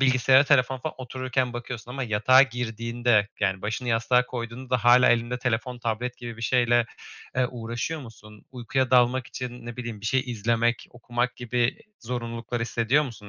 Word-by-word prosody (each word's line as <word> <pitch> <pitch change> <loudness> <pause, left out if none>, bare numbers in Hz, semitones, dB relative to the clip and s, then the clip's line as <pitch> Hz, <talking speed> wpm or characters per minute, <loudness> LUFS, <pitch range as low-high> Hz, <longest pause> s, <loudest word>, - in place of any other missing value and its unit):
bilgisayara, 130 +1 +5
telefona 130 -2 +3
falan 155 +5 -5
otururken 130 0 -2
bakıyorsun 120 -1 -7
ama 135 +2 -4
yatağa 120 +3 +5
girdiğinde, 115 -3 0
yani, 95 -2 0
başını 110 +4 -3
yastığa 120 +2 +2
koyduğunda 125 +1 -6
da 125 -2 0
hâlâ 125 +1 +7
elinde 120 +1 +1
telefon, 125 0 -2
tablet 120 +2 -3
gibi 120 -2 -8
bir 115 - -9
şeyle, 120 -1 +3 0.5
eee, 130 -1 +3
uğraşıyor 120 +6 -4
musun? 110 -4 -13
Uykuya 130 +1 -1
dalmak 125 0 +3
için, 125 -1 -7
ne 120 - -7
bileyim, 120 -4 -6
bir 105 - -5
şey 130 +4 +2
izlemek, 115 0 0
okumak 120 +1 -3
gibi 120 0 -1 0.2
zorunluluklar 115 0 -4
hissediyor 120 +5 +1
musun, 110 -6 -9
120 Hz, 165 wpm, -26 LUFS, 115-125 Hz, 0.5 s, hâlâ